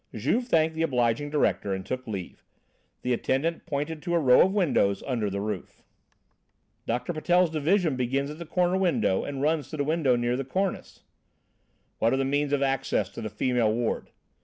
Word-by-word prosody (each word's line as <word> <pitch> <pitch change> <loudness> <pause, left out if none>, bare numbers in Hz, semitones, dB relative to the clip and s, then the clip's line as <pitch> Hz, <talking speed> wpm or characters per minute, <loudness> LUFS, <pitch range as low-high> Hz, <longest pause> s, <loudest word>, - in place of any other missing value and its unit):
Juve 180 - 0
thanked 160 -6 +2
the 160 - -3
obliging 125 -2 +1
director 140 -9 0
and 95 0 -6
took 130 -1 -4
leave. 95 -5 -6 0.6
The 125 - +1
attendant 155 +8 -1
pointed 150 +1 -3
to 175 +1 -1
a - - +4
row 130 -5 +6
of 190 - +4
windows 145 - +1
under 115 -6 -1
the 100 0 -3
roof. 105 -3 -5 1.0
"Doctor 125 +8 -1
Patel's 175 +2 +2
division 160 0 +1
begins 135 +3 -1
at 150 - -9
the 170 - -7
corner 180 +2 +1
window 175 - +1
and 140 -1 -4
runs 155 -2 0
to 155 - -6
the 145 - 0
window 150 -4 +2
near 120 0 0
the 135 - -2
cornice." 190 +8 -3 1.0
"What 115 - +2
are - - +2
the 135 - 0
means 145 +1 0
of 140 -1 +2
access 135 -1 0
to - - -8
the - - -4
female 120 -4 +1
ward?" 115 +1 -2
140 Hz, 185 wpm, -27 LUFS, 120-165 Hz, 1.0 s, row